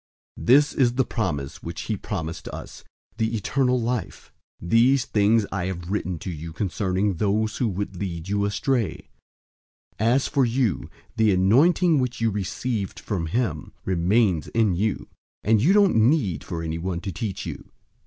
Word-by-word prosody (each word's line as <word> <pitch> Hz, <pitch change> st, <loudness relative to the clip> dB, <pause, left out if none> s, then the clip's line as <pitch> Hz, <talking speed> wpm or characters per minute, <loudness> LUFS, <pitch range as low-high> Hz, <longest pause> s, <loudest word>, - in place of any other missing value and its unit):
002:025 -, -, -7 dB
This 145 Hz, +4 st, +5 dB
is 125 Hz, -3 st, +2 dB
the 130 Hz, 0 st, +2 dB
promise 75 Hz, -11 st, -3 dB
which -, -, -6 dB
he -, -, -2 dB
promised 80 Hz, 0 st, -5 dB
us, -, -, -8 dB, 0.3 s
the 110 Hz, 0 st, 0 dB
eternal 125 Hz, +4 st, +1 dB
life. 120 Hz, +1 st, -4 dB, 0.3 s
002:026 85 Hz, -, -6 dB
These 125 Hz, +3 st, +4 dB
things 105 Hz, +1 st, +3 dB
I 95 Hz, -2 st, -2 dB
have 90 Hz, -1 st, -5 dB
written 95 Hz, -4 st, -2 dB
to 90 Hz, -, -6 dB
you 80 Hz, 0 st, -7 dB
concerning 95 Hz, +2 st, -1 dB
those 110 Hz, +3 st, 0 dB
who 125 Hz, -, +1 dB
would 100 Hz, -1 st, -3 dB
lead 85 Hz, -3 st, -5 dB
you 100 Hz, 0 st, 0 dB
astray. 110 Hz, +3 st, -1 dB, 0.9 s
002:027 110 Hz, -, +2 dB
As 135 Hz, +3 st, +2 dB
for 140 Hz, -3 st, +2 dB
you, 115 Hz, -, 0 dB, 0.3 s
the 110 Hz, -1 st, +4 dB
anointing 145 Hz, -, +4 dB
which 125 Hz, -2 st, -2 dB
you 115 Hz, -1 st, +1 dB
received 100 Hz, +2 st, -3 dB
from 90 Hz, -6 st, -3 dB
him 90 Hz, -, -2 dB
remains 95 Hz, -1 st, +2 dB
in 110 Hz, -5 st, +2 dB
you, 105 Hz, +3 st, -1 dB, 0.4 s
and 110 Hz, 0 st, +3 dB
you 155 Hz, -, +4 dB
don't 200 Hz, -, +5 dB
need 110 Hz, -, +2 dB
for 85 Hz, -3 st, -5 dB
anyone 85 Hz, +2 st, -3 dB
to 95 Hz, -, -4 dB
teach 105 Hz, -2 st, -4 dB
you. -, -, -7 dB
105 Hz, 165 wpm, -24 LUFS, 90-120 Hz, 0.9 s, This